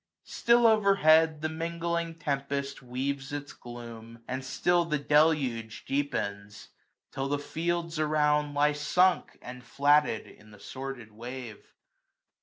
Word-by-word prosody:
Still 235 0 +3
over 215 -3 +5
head 160 -2 +4
The - - +2
mingling 170 +1 -3
tempest 140 -3 -3
weaves 135 +2 -4
its 145 0 -6
gloom, 115 -1 -11
and 130 +1 -4
still 175 +6 +1
The 160 -3 -1
deluge 145 -7 +1
deepens; 100 -8 -3 0.4
till 135 0 -3
the 145 +1 0
fields 170 +2 -3
around 150 -1 +1
Lie 150 +1 +3
sunk, 180 +5 +1
and 125 0 -9
flatted, 145 -2 +2
in 105 +1 -17
the 105 -1 -15
sordid 130 -3 -7
wave. 120 0 -9
145 Hz, 125 wpm, -28 LUFS, 125-160 Hz, 0.4 s, over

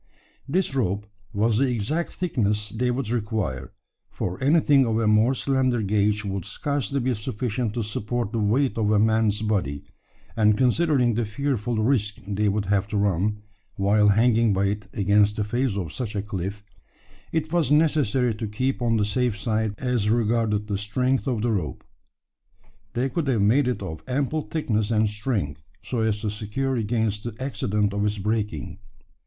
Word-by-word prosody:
This 180 0 +1
rope 105 -6 0 0.3
was 110 +1 +1
the 135 -1 +2
exact 135 +10 -1
thickness 105 - -1
they 125 +2 -1
would 125 -2 -2
require: 105 - -2 0.4
for 90 +7 -4
anything 145 -1 +5
of 115 -3 0
a 115 - +1
more 110 +5 +4
slender 130 -3 +1
gauge 105 +1 +1
would 95 -2 -3
scarcely 140 - -2
be 130 0 0
sufficient 115 0 -3
to 120 - -1
support 105 +1 -3
the 115 - -1
weight 115 +5 +1
of 105 -2 +1
a 105 - +4
man's 110 0 +2
body; 90 -10 -1 0.5
and 105 -2 +3
considering 130 -1 +3
the 120 +2 0
fearful 120 -1 -2
risk 110 -2 +1
they 105 +1 +1
would 100 0 -1
have 100 0 +1
to 105 0 -2
run, 100 +1 0 0.3
while 105 +2 +3
hanging 115 +1 +4
by 95 +1 +1
it 100 -1 -4
against 105 +1 +3
the 105 - -1
face 120 0 -1
of 85 -5 -4
such 115 -4 -4
a 100 - -1
cliff, 100 0 -5 0.7
it 160 0 -2
was 165 -6 +2
necessary 145 -6 +3
to 110 +1 -4
keep 130 +6 -2
on 115 -1 +2
the 105 - +2
safe 115 +1 0
side 110 0 -1
as 125 -5 0
regarded 110 -2 +1
the 100 -2 -2
strength 125 +6 0
of 120 -5 -1
the 120 - +1
rope. 80 -11 -3 1.1
They 125 +3 0
could 145 +3 -2
have 115 -7 +2
made 125 +6 +4
it 125 -5 -2
of 80 -4 -6
ample 140 +4 0
thickness 110 -9 -1
and 110 -1 +2
strength, 105 - -3 0.2
so 125 - -3
as 110 -2 0
to 110 -2 -1
secure 110 +6 -2
against 110 -2 -1
the 120 -2 -5
accident 105 -6 -1
of 100 0 -1
its 105 0 0
breaking. 105 -3 -2
110 Hz, 175 wpm, -24 LUFS, 105-125 Hz, 1.1 s, anything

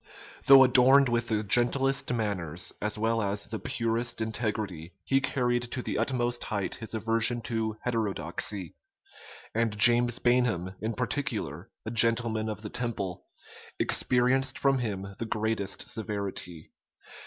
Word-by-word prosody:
Though 135 -1 +9
adorned 130 +1 +5
with 120 0 0
the 110 -2 -1
gentlest 130 +6 +2
manners, 95 -7 -2
as 105 +1 -2
well 115 +1 0
as 100 0 -1
the 110 0 -6
purest 115 -1 -2
integrity, 105 -6 -4
he 135 0 +2
carried 120 -3 0
to 125 - -3
the - - -3
utmost 120 -2 0
height 100 -3 -3
his 115 0 -5
aversion 115 +2 +1
to 110 -2 -3
heterodoxy; 105 -5 -2 0.8
and 115 -2 -1
James 120 +2 +6
Bainham, 120 -8 +1
in 110 +1 -3
particular, 115 - -3 0.2
a 110 - -4
gentleman 115 -1 +2
of 105 0 -6
the 105 - -6
Temple, 100 -7 -4 0.5
experienced 130 +2 +2
from 135 -2 +2
him 100 -4 -4
the 115 - -3
greatest 110 -3 -2
severity. 100 -6 -5
115 Hz, 130 wpm, -28 LUFS, 105-120 Hz, 0.8 s, Though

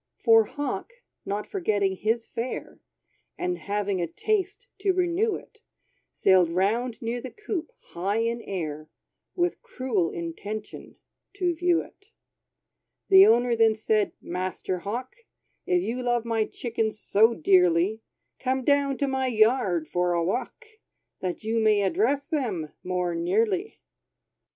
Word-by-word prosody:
For 225 -2 +5
Hawk, 290 - -4 0.3
not 205 +1 -2
forgetting 205 - 0
his 225 +4 0
fare, 240 +2 -5 0.6
And 360 0 -2
having 200 -2 -1
a 170 - -1
taste 405 - -2
to 390 -1 +2
renew 365 +4 +1
it, 440 - -12 0.5
Sailed 185 -3 +4
round 220 +7 0
near 235 +2 -2
the 260 - -6
coop, 400 -4 -5 0.2
high 195 +5 -1
in 230 +1 0
air, 155 -6 -5 0.5
With 350 0 0
cruel 255 - -1
intention, 200 +6 -6 0.4
to 360 -3 0
view 345 0 +2
it. 400 - -20 1.0
The 385 0 +9
owner 240 +1 +4
then 225 -1 +4
said, 215 -1 +1
"Master 185 +1 -3
Hawk, 240 - -5 0.5
If 360 -1 +2
you 245 +3 -2
love 240 -1 0
my 225 -2 +1
chickens 225 -3 -3
so 225 +4 +3
dearly, 180 +4 +3 0.4
Come 260 0 -1
down 280 0 +2
to 280 - 0
my 265 -1 0
yard 215 -8 +2
for 180 +1 0
a 170 -1 +1
walk, 200 +9 -3 0.5
That 185 +3 -4
you 225 +1 0
may 215 -2 +3
address 285 - +1
them 225 - -2
more 180 -1 -1
nearly." 215 - 0
225 Hz, 135 wpm, -26 LUFS, 190-280 Hz, 1.0 s, The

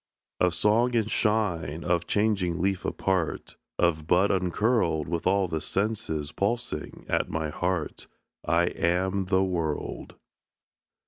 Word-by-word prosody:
Of 90 -1 +2
song 120 +4 +3
and 110 -2 +1
shine, 85 -8 0
of 85 -1 0
changing 100 -5 +1
leaf 95 +1 0
apart, 95 -4 -1 0.2
Of 80 -3 +1
bud 90 +4 +4
uncurled: 90 - +1
With 85 0 -2
all 95 0 +3
the 80 -2 -3
senses 100 -8 -2
pulsing 110 -4 -3
at - - 0
my 80 -1 -2
heart, 90 +1 -2 0.4
I 85 +1 +2
am 95 +3 0
the 95 0 +2
world. 85 -5 -3
90 Hz, 125 wpm, -27 LUFS, 85-100 Hz, 0.4 s, bud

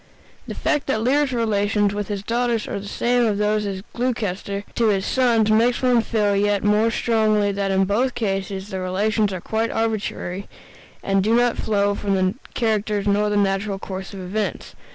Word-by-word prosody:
The - - -5
fact 295 -2 0
that 220 -5 0
Lear's 280 +3 +2
relations 205 -3 +1
with 205 -1 -3
his 200 -2 -4
daughters 235 0 0
are - - -3
the 200 - -8
same 240 +2 +1
as 205 -2 0
those 210 0 +1
of 190 -1 -5
Gloucester 205 -5 -2
to 230 - +1
his 195 -3 +1
sons 230 -4 +2
makes 235 +4 +2
one 250 -2 +4
feel 210 -3 +1
yet 205 0 +1
more 210 +2 +3
strongly 215 -3 +1
that 200 0 -2
in 190 0 +2
both 240 +6 0
cases 195 -2 -3
the 190 -2 -4
relations 205 +3 0
are 185 - -4
quite 220 +5 -1
arbitrary, 210 -4 -2 0.6
and 195 -1 +1
do 220 +3 +3
not 240 0 +3
flow 205 -1 +1
from 200 -1 -1
the 185 0 +1 0.2
characters 215 -3 0
nor 205 +1 +2
the 205 - 0
natural 195 0 0
course 190 -1 -7
of 195 -2 -8
events. 200 +4 -3
210 Hz, 185 wpm, -22 LUFS, 200-225 Hz, 0.6 s, one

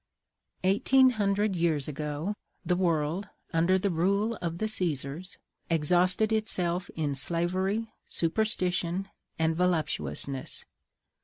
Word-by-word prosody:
Eighteen 260 +7 +5
Hundred 205 -2 +1
years 165 -5 +1
ago, 150 +5 -3 0.3
the 180 - +2
world, 170 +1 0 0.3
under 170 +3 +3
the 195 +1 0
rule 200 +7 +1
of 170 -1 -3
the 215 - -1
Caesars, 170 -3 -1 0.3
exhausted 180 +7 +3
itself 180 -5 0
in 150 -3 -1
slavery, 185 +9 +1
superstition, 185 0 0 0.3
and 160 0 +1
voluptuousness. 140 - -2
180 Hz, 100 wpm, -29 LUFS, 160-195 Hz, 0.3 s, Eighteen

